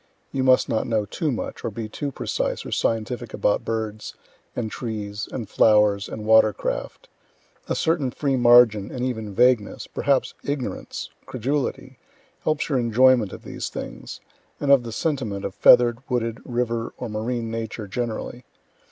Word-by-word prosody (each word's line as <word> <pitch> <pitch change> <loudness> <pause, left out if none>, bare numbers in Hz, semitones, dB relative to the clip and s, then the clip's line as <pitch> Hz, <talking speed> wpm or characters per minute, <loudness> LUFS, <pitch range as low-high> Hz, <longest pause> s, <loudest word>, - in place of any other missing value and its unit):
(You 135 - -1
must 130 -1 +4
not 110 - -1
know 110 -3 0
too 150 +9 -2
much, 120 - -5
or - - -1
be 110 +1 -5
too 140 +6 -4
precise - - -2
or - - -7
scientific 115 +1 -1
about 105 - +1
birds 110 -2 -4 0.4
and 110 -3 -3
trees 105 -3 -5
and 120 -5 -5
flowers 105 -1 +3
and 110 -1 -6
water 110 -1 +6
craft; - - -4 0.6
a - - +1
certain 160 -5 +1
free 135 +2 -1
margin, 120 -4 +6
and 125 -1 -3
even 110 -5 -4
vagueness 125 -3 +2
perhaps 140 -2 0
ignorance, 140 -3 -4 0.2
credulity 130 0 -3 0.5
helps 155 -1 0
your 135 -4 +1
enjoyment 120 -2 +4
of - - -10
these - - -5
things, - - -7 0.4
and 140 -1 +1
of 140 -2 +7
the 120 -1 -7
sentiment 115 -8 -2
of 95 - -4
feather'd, 120 +1 +6
wooded, 115 -2 -1
river, 120 -1 -2
or 125 - -5
marine 115 +1 -3
Nature 110 -1 -4
generally. 120 +3 -4
115 Hz, 155 wpm, -24 LUFS, 110-130 Hz, 0.6 s, of